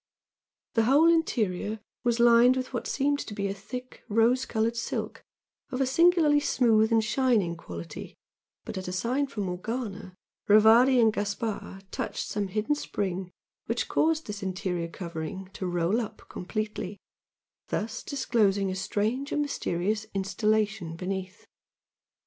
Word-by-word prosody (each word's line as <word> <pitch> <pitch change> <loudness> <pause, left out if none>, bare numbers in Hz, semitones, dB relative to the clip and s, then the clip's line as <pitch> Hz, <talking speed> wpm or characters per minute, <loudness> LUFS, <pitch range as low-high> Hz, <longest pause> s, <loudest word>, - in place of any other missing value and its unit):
The 225 -1 +3
whole 300 +7 +6
interior 215 - 0 0.2
was 240 -1 +1
lined 240 +2 +6
with 255 0 -4
what 240 - -3
seemed 285 +1 +1
to 210 - -6
be 200 -1 -1
a 195 - -2
thick 250 +6 -8
rose 230 +4 +3
coloured 225 +1 0
silk 230 - -4 0.5
of 260 -1 -4
a 270 - +3
singularly 320 +1 +4
smooth 225 -6 +3
and 225 -1 +4
shining 215 -6 +1
quality, 85 - -8 0.5
but - - -5
at 185 - -7
a - - -3
sign 250 +9 0
from 210 -6 -4
Morgana, 195 +1 -4 0.3
Rivardi 225 +5 +6
and 225 -2 +5
Gaspard 205 -1 -3
touched - - -3
some 205 -1 -2
hidden 215 +8 0
spring 190 -10 -3 0.4
which - - -1
caused 320 0 +1
this 205 0 -6
interior 185 -2 -2
covering 175 +2 -6
to 185 - -4
roll 175 +6 +1
up 220 - -8
completely, 210 0 -4 0.7
thus 220 +1 -3
disclosing 205 -8 +1
a - - -3
strange 220 +8 -1
and 295 - +1
mysterious 210 -5 -2
"installation" 200 -2 0
beneath. 185 +2 -5
215 Hz, 140 wpm, -28 LUFS, 190-250 Hz, 0.7 s, whole